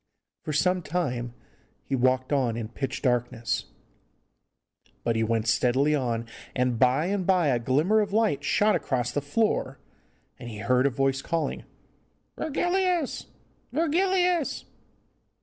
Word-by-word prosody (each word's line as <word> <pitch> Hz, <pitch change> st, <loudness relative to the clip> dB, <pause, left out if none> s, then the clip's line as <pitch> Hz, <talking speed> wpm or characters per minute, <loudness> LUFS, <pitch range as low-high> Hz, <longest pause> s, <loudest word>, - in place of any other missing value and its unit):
For -, -, -4 dB
some 180 Hz, +5 st, +2 dB
time 125 Hz, -8 st, -3 dB, 0.5 s
he 135 Hz, -, -1 dB
walked 130 Hz, +2 st, +1 dB
on 125 Hz, -5 st, +1 dB
in 110 Hz, -2 st, -4 dB
pitch 135 Hz, +2 st, -4 dB
darkness, 120 Hz, -2 st, 0 dB, 1.4 s
but 115 Hz, -1 st, 0 dB
he 110 Hz, -, +1 dB
went 115 Hz, 0 st, 0 dB
steadily 130 Hz, +6 st, +2 dB
on, 120 Hz, -5 st, -1 dB, 0.3 s
and 125 Hz, -2 st, 0 dB
by 130 Hz, +4 st, +3 dB
and 195 Hz, +1 st, -1 dB
by 180 Hz, -5 st, +3 dB
a 125 Hz, -3 st, +2 dB
glimmer 150 Hz, -, +2 dB
of 205 Hz, -2 st, 0 dB
light 205 Hz, -10 st, +1 dB
shot 210 Hz, +8 st, +3 dB
across 130 Hz, -6 st, -1 dB
the 145 Hz, -, -1 dB
floor, 210 Hz, +11 st, 0 dB, 0.6 s
and 120 Hz, -, -7 dB
he 110 Hz, -, -7 dB
heard 125 Hz, +6 st, +2 dB
a -, -, +2 dB
voice 135 Hz, +1 st, 0 dB
calling, 165 Hz, +2 st, -2 dB, 0.7 s
'Virgilius! 350 Hz, 0 st, 0 dB, 0.4 s
Virgilius! 350 Hz, +2 st, +1 dB
140 Hz, 130 wpm, -26 LUFS, 125-200 Hz, 1.4 s, by